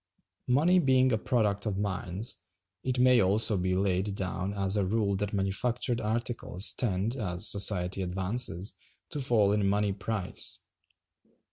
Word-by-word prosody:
Money 160 +9 +3
being 130 -4 +3
a 110 - +2
product 110 -4 -1
of 100 -2 -2
mines, 100 +1 -3 0.5
it 130 -1 -2
may 125 -1 +5
also 105 +3 +5
be 90 0 -1
laid 95 +1 -1
down 95 0 -3
as 100 -1 0
a 100 - +1
rule 100 +1 0
that 100 +1 -3
manufactured 115 +5 -1
articles 110 -3 -1
tend, 105 0 -2
as 100 -4 -2
society 95 -2 0
advances, 95 +1 -1 0.4
to 150 - -4
fall 115 -6 +2
in 105 -1 +1
money 100 0 0
price. 100 -1 +1
100 Hz, 140 wpm, -28 LUFS, 95-120 Hz, 0.5 s, may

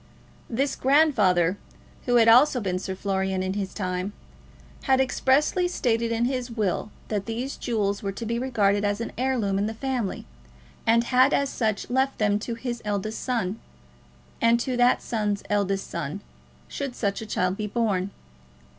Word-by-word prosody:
This 270 +4 0
grandfather, 210 - +3 0.5
who 245 - +3
had 230 -1 +6
also 250 +3 +6
been 185 -4 -2
Sir 190 0 -4
Florian 190 -1 -1
in 190 0 -2
his 195 -1 -3
time, 185 0 -3 0.7
had 265 -1 +4
expressly 275 +7 +2
stated 235 -8 0
in 230 +1 +1
his 255 -1 -2
will 215 -3 -1 0.2
that 205 -1 -2
these 240 +4 -3
jewels 205 -4 -1
were 200 - -2
to 230 +4 -6
be 235 +1 -1
regarded 205 -6 +1
as 205 0 0
an 230 - -4
heirloom 235 -6 0
in 205 - 0
the 220 - -5
family, 250 -4 -3 0.6
and 230 +1 +5
had 255 +3 +4
as 280 -1 0
such 215 -4 -1
left 265 +2 0
them 205 -1 +2
to 230 +2 -4
his 240 0 -5
eldest 210 +1 -3
son, 225 -5 -1 0.8
and 230 0 +4
to 255 +1 -2
that 245 0 +3
son's 210 -3 -1
eldest 195 -1 0
son, 170 +4 -4 0.5
should 275 -3 -5
such 200 -1 -1
a 220 - -7
child 180 -2 0
be 210 +1 -3
born. 205 -4 0
225 Hz, 165 wpm, -25 LUFS, 200-250 Hz, 0.8 s, had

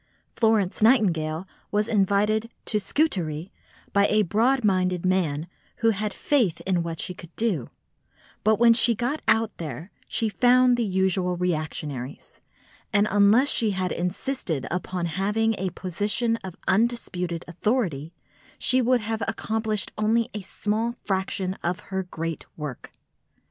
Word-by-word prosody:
Florence 220 -5 +2
Nightingale 180 -8 +3 0.2
was 210 +1 +1
invited 210 +1 +2
to 230 - -12
go - - -34
to 210 - +1
Scutari 185 - -1 0.4
by 200 0 +4
a 215 0 +3
broad 235 +8 +2
minded 185 -3 +1
man 165 -5 +1 0.3
who 225 -1 +2
had 210 0 -2
faith 235 - +1
in 185 -2 0
what 165 -1 -4
she 180 - -2
could 175 -2 -13
do; 200 - -1 0.7
but 220 +1 +4
when 235 0 +6
she 230 0 +4
got 250 +7 -2
out 225 -1 +2
there, 160 - -6 0.2
she 225 - 0
found 250 +3 +4
the 240 - 0
usual 185 -2 0
reactionaries, 155 -6 -4 0.5
and 205 +1 +3
unless 210 +7 +5
she 225 - +2
had 185 -1 -1
insisted 180 - -2
upon 180 0 -2
having 210 +6 0
a 190 0 -1
position 205 +6 -1
of 190 -5 -9
undisputed 185 -5 0
authority, 175 - -1 0.5
she 255 -2 +3
would 250 0 +3
have 220 +1 -3
accomplished 220 -2 -1
only 230 +3 +2
a 210 - -4
small 215 +4 -2
fraction 190 -3 -2
of 175 +1 -1
her 190 0 0
great 165 -3 -5
work. 150 -5 -7
200 Hz, 145 wpm, -25 LUFS, 180-225 Hz, 0.7 s, when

